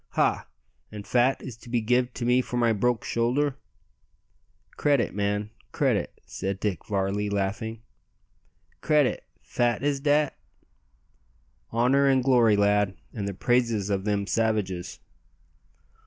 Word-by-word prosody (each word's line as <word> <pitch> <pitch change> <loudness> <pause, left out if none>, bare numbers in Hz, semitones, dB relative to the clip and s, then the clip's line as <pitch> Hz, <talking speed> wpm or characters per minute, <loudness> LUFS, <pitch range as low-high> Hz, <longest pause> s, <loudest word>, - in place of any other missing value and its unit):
"Ha! - - +1 0.4
an' 105 -1 -7
fat 125 +5 +1
is 130 -5 -7
to 120 - -14
be 120 0 +1
give 125 +3 +1
to 120 - -3
me 125 +1 +4
for 125 - -5
my 115 -2 +3
broke 120 +2 0
shoulder?" 130 +4 0 1.2
"Credit, 140 -4 +1
man, 105 +1 -1 0.2
credit," - - 0
said 95 0 -4
Dick 100 -3 -2
Varley, 100 +1 -1
laughing. 105 +3 -3 1.0
"Credit! 150 -4 +2 0.2
fat 120 0 0
is 145 -1 +1
dat?" 145 0 +2 1.4
"Honour 130 +4 +3
and 135 -2 +3
glory, 120 -5 +4
lad, 100 -1 +2 0.2
and 100 -3 -4
the 100 - -4
praises 115 -3 +1
of 95 0 -1
them 100 -1 0
savages." 100 -4 -1
115 Hz, 125 wpm, -26 LUFS, 100-125 Hz, 1.4 s, me